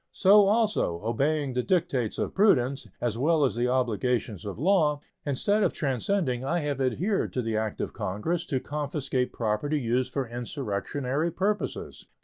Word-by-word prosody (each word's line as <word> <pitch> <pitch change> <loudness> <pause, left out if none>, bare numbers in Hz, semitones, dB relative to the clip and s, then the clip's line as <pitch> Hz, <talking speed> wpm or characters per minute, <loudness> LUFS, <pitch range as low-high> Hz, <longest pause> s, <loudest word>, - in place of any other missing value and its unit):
So 200 +1 +6
also, 210 - +1
obeying 140 +4 0
the 125 - +1
dictates 155 - 0
of - - -2
prudence, 140 - +3
as 115 -1 -2
well 155 +1 +3
as 130 - 0
the 120 +1 0
obligations 120 -4 0
of 100 - -5
law, 155 - +3 0.3
instead 200 +10 +1
of - - +2
transcending 135 - -1
I 165 +6 0
have 145 -2 -2
adhered 170 - 0
to 125 - -1
the 115 -1 -2
act 110 -1 -2
of - - -3
Congress 160 - -2
to 135 -5 0
confiscate 140 -3 -2
property 115 +7 -1
used 125 +1 0
for 135 -1 -2
insurrectionary 125 - -2
purposes. 200 +5 -3
135 Hz, 155 wpm, -27 LUFS, 120-165 Hz, 0.3 s, So